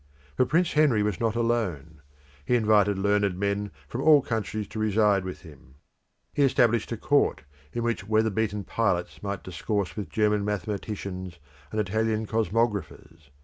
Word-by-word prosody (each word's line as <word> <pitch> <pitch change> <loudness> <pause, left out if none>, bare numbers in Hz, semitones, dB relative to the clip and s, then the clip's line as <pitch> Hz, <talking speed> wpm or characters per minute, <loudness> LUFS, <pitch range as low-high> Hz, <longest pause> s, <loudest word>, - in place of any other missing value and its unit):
But 130 - +2
Prince 170 +4 +2
Henry 145 -9 +4
was 105 -3 -1
not 115 -1 0
alone. 95 -11 -1 0.4
He 125 - +1
invited 105 -3 +3
learned 100 -1 +1
men 100 +1 -1 0.2
from 125 - -4
all 150 -2 +6
countries 110 -2 -3
to 110 - -6
reside 105 -2 +2
with 95 0 -7
him. 70 -5 -15 0.6
He 145 - 0
established 120 -5 +3
a 115 - -2
court, 145 +6 +1 0.3
in 120 - -3
which 115 -4 -2
weather 110 0 +2
beaten 105 -1 -1
pilots 90 -4 -1
might 100 -1 -4
discourse 95 +2 -3
with 105 - -5
German 105 -1 +1
mathematicians 100 -2 -4 0.3
and 110 - -2
Italian 110 +2 0
cosmographers. 105 -7 -2
105 Hz, 150 wpm, -26 LUFS, 100-115 Hz, 0.6 s, all